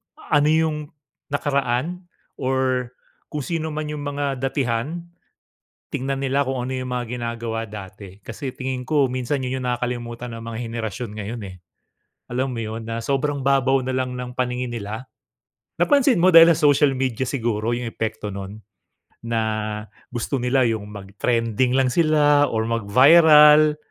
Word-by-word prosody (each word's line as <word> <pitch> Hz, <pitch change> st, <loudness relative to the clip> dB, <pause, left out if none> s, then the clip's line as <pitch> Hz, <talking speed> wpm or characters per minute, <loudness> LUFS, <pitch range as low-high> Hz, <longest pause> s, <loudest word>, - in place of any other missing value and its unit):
ano 145 Hz, 0 st, +1 dB
'yong 155 Hz, -2 st, 0 dB, 0.4 s
nakaraan 145 Hz, +5 st, -1 dB, 0.3 s
or 130 Hz, -1 st, 0 dB, 0.4 s
kung 150 Hz, -, -2 dB
sino 160 Hz, -1 st, -3 dB
man 155 Hz, 0 st, -4 dB
'yong 150 Hz, -1 st, -5 dB
mga 145 Hz, 0 st, -2 dB, 0.2 s
datihan. 135 Hz, +4 st, -1 dB, 0.9 s
Tingnan 135 Hz, +1 st, -2 dB
nila 135 Hz, +1 st, +1 dB
kung 130 Hz, -1 st, -2 dB
ano 130 Hz, -, -4 dB
'yong 130 Hz, -1 st, -4 dB
mga 125 Hz, -1 st, -2 dB
ginagawa 115 Hz, -1 st, -3 dB
dati. 95 Hz, -1 st, -10 dB
Kasi 130 Hz, +4 st, -5 dB
tingin 130 Hz, -1 st, -4 dB
ko, 145 Hz, -3 st, +3 dB
minsan 130 Hz, +2 st, -2 dB
'yon 130 Hz, +1 st, -3 dB
'yong -, -, -4 dB
nakakalimutan 120 Hz, -1 st, -4 dB
ng 115 Hz, 0 st, -8 dB
mga 110 Hz, -, -6 dB
henerasyon 115 Hz, -1 st, -5 dB
ngayon 110 Hz, +2 st, -6 dB
eh. 95 Hz, -1 st, -9 dB, 0.7 s
Alam 130 Hz, +1 st, -1 dB
mo 115 Hz, -, -3 dB
'yon, 110 Hz, +1 st, -6 dB
na 115 Hz, 0 st, -4 dB
sobrang 140 Hz, +1 st, -1 dB
babaw 135 Hz, -1 st, +2 dB
na 130 Hz, -, -2 dB
lang 130 Hz, -1 st, -2 dB
ng 125 Hz, 0 st, -5 dB
paningin 125 Hz, -1 st, -2 dB
nila. 110 Hz, +2 st, -6 dB, 0.7 s
Napansin 280 Hz, -, +4 dB
mo, 180 Hz, +2 st, +4 dB
dahil 165 Hz, 0 st, +10 dB
sa 155 Hz, -1 st, +2 dB
social 145 Hz, 0 st, +4 dB
media 130 Hz, -2 st, -1 dB
siguro, 115 Hz, -4 st, -1 dB
'yong 120 Hz, 0 st, -4 dB
epekto 110 Hz, -2 st, -4 dB
no'n, 100 Hz, +2 st, -7 dB, 0.6 s
na 115 Hz, -1 st, -1 dB, 0.7 s
gusto 125 Hz, +2 st, -3 dB
nila 125 Hz, 0 st, +2 dB
'yong 110 Hz, -2 st, -2 dB
mag-trending 115 Hz, +5 st, -1 dB
lang 130 Hz, -1 st, +3 dB
sila 150 Hz, -3 st, +4 dB
or 110 Hz, 0 st, -1 dB
mag-viral. 150 Hz, +7 st, +6 dB
125 Hz, 150 wpm, -22 LUFS, 115-145 Hz, 0.9 s, dahil